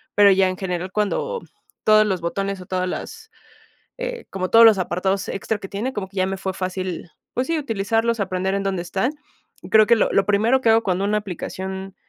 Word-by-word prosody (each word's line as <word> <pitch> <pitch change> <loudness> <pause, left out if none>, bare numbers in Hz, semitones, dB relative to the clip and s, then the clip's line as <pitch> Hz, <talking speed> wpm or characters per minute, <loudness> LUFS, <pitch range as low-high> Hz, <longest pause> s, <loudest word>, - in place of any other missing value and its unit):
pero 205 -1 +7
ya 190 0 +4
en 185 - -3
general 180 -1 -3
cuando, 215 - -1 0.4
todos 215 0 +6
los 185 -4 -1
botones 195 +2 -3
o - - -10
todas 185 0 -1
las, 440 - -7 0.7
eh, - - -5
como 185 -1 -3
todos 230 0 +8
los 220 -3 +7
apartados 190 +2 -1
extra 210 +2 -2
que 195 - -8
tiene, 235 +7 -3
como 190 -2 -4
que 195 - -14
ya 185 - +2
me 195 - -2
fue 190 0 -3
fácil, 185 -2 -4 0.2
pues 255 +2 -1
sí, 330 -1 0
utilizarlos 225 -2 0
aprender 190 0 -1
en 200 - -1
dónde 190 -3 -1
están. 200 - -1 0.6
Creo 215 -1 +6
que 235 - +6
lo - - +1
lo 195 - +3
primero 220 +6 +3
que 230 - +2
hago 225 +1 +4
cuando 190 0 0
una 210 +1 +1
aplicación, 190 0 -6
195 Hz, 210 wpm, -22 LUFS, 185-220 Hz, 0.7 s, todos